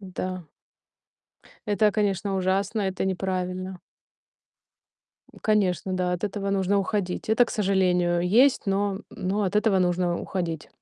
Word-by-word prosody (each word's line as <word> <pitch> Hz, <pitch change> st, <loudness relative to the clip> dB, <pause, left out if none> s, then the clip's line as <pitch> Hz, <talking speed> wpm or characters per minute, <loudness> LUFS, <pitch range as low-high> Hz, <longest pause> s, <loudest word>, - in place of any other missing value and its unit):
Да. 185 Hz, -2 st, -5 dB, 1.2 s
Это, 210 Hz, 0 st, +3 dB
конечно, 200 Hz, -2 st, 0 dB
ужасно, 195 Hz, +3 st, 0 dB
это 190 Hz, -1 st, -2 dB
неправильно. 185 Hz, -1 st, -3 dB, 1.6 s
Конечно, 190 Hz, -4 st, +1 dB
да, 180 Hz, -1 st, 0 dB
от 180 Hz, +3 st, -2 dB
этого 200 Hz, -1 st, -3 dB
нужно 195 Hz, 0 st, +1 dB
уходить. 195 Hz, -1 st, -2 dB
Это, 220 Hz, +3 st, +5 dB
к -, -, -9 dB
сожалению, 180 Hz, -4 st, +2 dB
есть, 250 Hz, +8 st, +4 dB
но, 200 Hz, 0 st, +1 dB
м, 210 Hz, -, -11 dB
но 200 Hz, +3 st, -2 dB
от 195 Hz, +2 st, 0 dB
этого 210 Hz, -3 st, +3 dB
нужно 175 Hz, -1 st, +1 dB
уходить. 165 Hz, -4 st, -4 dB
190 Hz, 130 wpm, -25 LUFS, 180-205 Hz, 1.6 s, Это